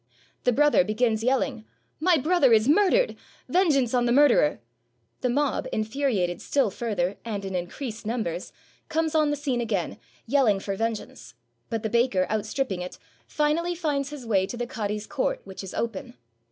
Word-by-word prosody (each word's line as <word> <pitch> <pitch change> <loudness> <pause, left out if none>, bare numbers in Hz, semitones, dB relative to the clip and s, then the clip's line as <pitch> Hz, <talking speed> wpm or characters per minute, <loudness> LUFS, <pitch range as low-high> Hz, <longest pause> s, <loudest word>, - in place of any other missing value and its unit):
The 250 - +5
brother 290 +2 +4
begins 220 0 0
yelling, 255 -2 0 0.4
"My 345 +1 +4
brother 295 -3 +3
is 220 +1 +4
murdered! 415 - +4 0.3
Vengeance 290 -10 +2
on 245 -1 +2
the - - +2
murderer!" 260 - +4 0.6
The 250 - 0
mob, 285 +3 0
infuriated 215 -6 -1
still 275 -8 +1
further, 200 -4 -2
and, 205 -4 -4
in 190 - -5
increased 215 +7 -5
num 225 +1 -1
bers, 170 0 -5 0.4
come 320 0 0
on 310 -2 +3
the 295 - +1
scene 270 -4 -1
again, 205 -7 -2 0.3
yelling 235 -6 +3
for 195 0 -3
vengeance; 220 - -4 0.3
but 225 -2 -3
the - - 0
baker, 235 -6 +2
outstripping 215 -2 -1
it, 180 - -7 0.3
finally 325 +4 0
finds 290 -5 -1
his 290 -4 -8
way 195 -4 +2
to 240 - -6
the 240 - -2
cadi's 210 -3 -3
court, - - -1
which 190 0 -9
is 190 - -8
open. 225 - -4
240 Hz, 165 wpm, -26 LUFS, 210-290 Hz, 0.6 s, The